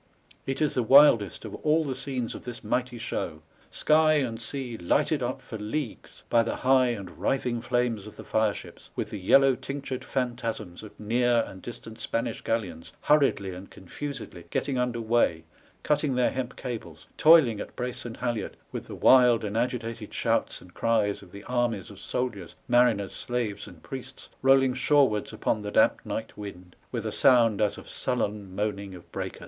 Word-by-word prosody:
It 135 +3 0
is 150 - +1
the 125 - +1
wildest 120 -4 +5
of - - -7
all 155 +1 +2
the 140 -3 -2
scenes 130 -3 -3
of - - -9
this 120 -1 -7
mighty 125 -1 -1
show: 80 -8 -4 0.3
sky 155 0 +4
and 125 -7 0
sea 125 0 -3
lighted 140 - +1
up 125 +2 -3
for 110 - -7
leagues 110 +4 -5
by 115 - +4
the 115 - -2
high 130 0 +4
and 100 -7 -5
writhing 125 -3 0
flames 120 -4 -1
of 105 - -11
the - - -10
fire 110 -2 +1
ships, - - -11
with - - -3
the 105 - -5
yellow 135 +8 +5
tinctured 135 0 -5
phantasms 120 -9 -3
of 110 -2 -13
near 120 +2 +2
and 95 - -11
distant 115 0 -9
Spanish 115 - -2
galleons 90 -8 -3
hurriedly 135 -10 +2
and 90 +2 -10
confusedly 110 -3 -7
getting 135 -1 -1
under 125 -1 -1
way, 110 -8 +1 0.4
cutting 150 -2 +1
their 125 -1 +2
hemp 130 -1 -4
cables, 95 - -7
toiling 150 -9 +6
at - - -7
brace 125 0 -4
and 115 -2 -7
halliard, 120 -3 -3
with - - -6
the - - -7
wild 125 -3 +6
and 105 0 -3
agitated 115 -2 -2
shouts - - 0
and 90 0 -16
cries 110 -3 +1
of 90 - -15
the 100 0 -10
armies 120 -6 -1
of 100 0 -13
soldiers, 110 -9 -3
mariners, 120 -5 +3
slaves, 115 -5 -3
and - - -14
priests 130 0 -8
rolling 135 -1 +5
shore^ards 135 -5 +2
upon 110 - -1
the 105 - -4
damp - - +3
night 110 - -5
wind, 90 -3 -9 0.2
with 115 -3 -3
a 110 - -2
sound 115 -3 +4
as 105 - +1
of - - -11
sullen 105 -6 -3
moaning 100 -2 -3
of 90 - -14
breakers. - - -5
120 Hz, 180 wpm, -27 LUFS, 105-130 Hz, 0.4 s, toiling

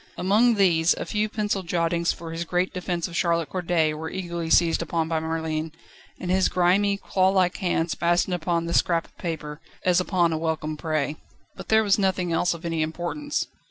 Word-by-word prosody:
Among 220 +6 +3
these, 175 -4 +3
a - - -5
few 215 0 -1
pencil 210 -2 -1
jottings 170 -1 0
for 165 -1 -8
his 165 +1 -3
great 180 +2 -1
defence 175 -1 -2
of 170 - -9
Charlotte 170 -2 +1
Corday 170 -4 0
were 160 +1 -5
eagerly 170 -3 -4
seized 165 0 +4
upon 165 0 -1
by 160 -1 0
Merlin, 160 0 -3 0.5
and 180 - -3
his 190 0 +3
grimy, 195 +3 +2
clawlike 190 -2 +1
hands 175 -3 0
fastened 175 +2 +1
upon 170 -1 -1
this 170 - +1
scrap 170 -2 +1
of - - -24
paper, 155 -3 -5 0.3
as 180 -1 +4
upon 180 -3 +1
a 160 - -2
welcome 160 -1 -2
prey. 155 -1 -2 0.4
But - - -10
there 220 0 +5
was 205 -1 +3
nothing 185 -3 0
else 170 +1 +1
of 170 +1 -10
any 165 -1 -1
importance. 175 - -2
170 Hz, 190 wpm, -25 LUFS, 165-185 Hz, 0.5 s, there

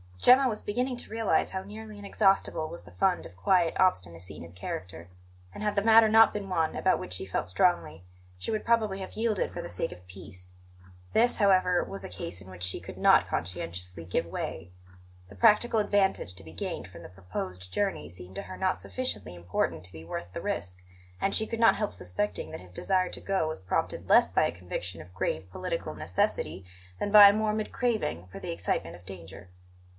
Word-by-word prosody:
Gemma 255 - +6
was 215 -4 -2
beginning 250 +4 -1
to - - -6
realize 225 -2 +1
how 190 0 -3
nearly 215 +1 -9
inexhaustible 195 -5 +1
was 170 - -9
the - - -15
fund 190 -2 +1
of - - -12
quiet 170 - +2
obstinacy 90 - +1
in - - -9
his 85 0 -12
character; 90 -1 -6 0.4
and, - - -7
had 210 -1 0
the 200 - +3
matter 225 +1 +7
not 225 +1 +7
been 205 -2 -4
one 165 -3 0
about 190 - +2
which 90 - -6
she 95 - -3
felt 95 -2 -2
strongly, 90 - +1 0.3
she 90 - -4
would 215 - -2
probably 220 -4 +2
have 190 - -7
yielded 220 -3 0
for - - -5
the - - -7
sake 90 - -2
of 90 +1 -12
peace. 90 -1 -11 0.6
This, 240 +2 +3
however, 185 -4 +4
was 100 0 -6
a - - -6
case 85 -1 -5
in 95 - -12
which 90 -1 -11
she 90 - +1
could - - -10
not - - +5
conscientiously 90 0 -4
give 90 - -1
way; 85 +1 -5 0.6
the - - -13
practical 225 0 +4
advantage 200 - +1
to 95 - -10
be 80 - -12
gained 85 - -4
from - - -12
the - - -10
proposed 90 0 -7
journey 195 - -1
seemed 90 +2 -12
to - - -4
her 185 - -9
not 185 0 +1
sufficiently 255 - -4
important 85 -2 -2
to 90 - -11
be 80 0 -9
worth 85 +1 -6
the - - -4
risk, 90 +1 -3 0.4
and 195 - 0
she 220 - +1
could 230 - -4
not 230 - +6
help 210 - -2
suspecting 90 +4 -3
that - - -6
his 90 -1 -14
desire 185 - +1
to - - -7
go 195 -5 0
was 160 - -4
prompted 95 - -2
less - - +6
by - - +3
a - - 0
conviction 90 0 -5
of 90 - -14
grave 90 0 -2
political - - -3
necessity 90 +2 -1 0.4
than 205 - -1
by 205 -1 +11
a - - +3
morbid 215 0 -1
craving 220 - -1
for - - -8
the - - -5
excitement 85 0 -2
of 90 +1 -16
danger. 90 -1 -10
155 Hz, 210 wpm, -29 LUFS, -, 0.6 s, by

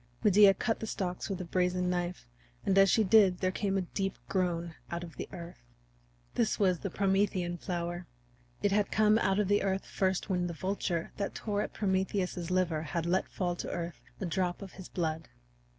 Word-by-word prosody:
Medea 200 -1 +7
cut 225 +3 -1
the 220 - -4
stalks 180 -3 -3
with 195 -2 -3
a - - -4
brazen 180 +1 +1
knife, 180 0 -2 0.4
and 195 - +2
as 195 0 +7
she 220 - +4
did 195 -2 +5
there 185 0 0
came 195 0 0
a 190 - 0
deep 195 +2 -3
groan 175 -3 -1 0.2
out 170 0 -3
of 165 -4 -9
the - - -6
earth. 170 0 -9 0.7
This 225 - +1
was 185 -4 +2
the 195 - -3
Promethean 190 -2 +1
flower. 175 0 -3 0.6
It 205 - +3
had 205 0 +2
come 215 +1 +4
out 190 -3 +2
of 210 -2 +2
the 205 +1 +3
earth 195 0 -1
first 190 -1 0
when 180 -3 0
the 170 - -5
vulture 180 -2 -2
that 200 - -3
tore 205 -2 -1
at - - -4
Prometheus's 190 -3 -1
liver 180 -4 +1
had 165 +1 -2
let 180 +2 +1
fall 175 -2 -1
to - - -4
earth 170 -2 -4 0.2
a 195 - -2
drop 180 +2 -1
of 190 - -9
his 190 - -10
blood. 160 -2 -2
185 Hz, 200 wpm, -31 LUFS, 175-195 Hz, 0.7 s, Medea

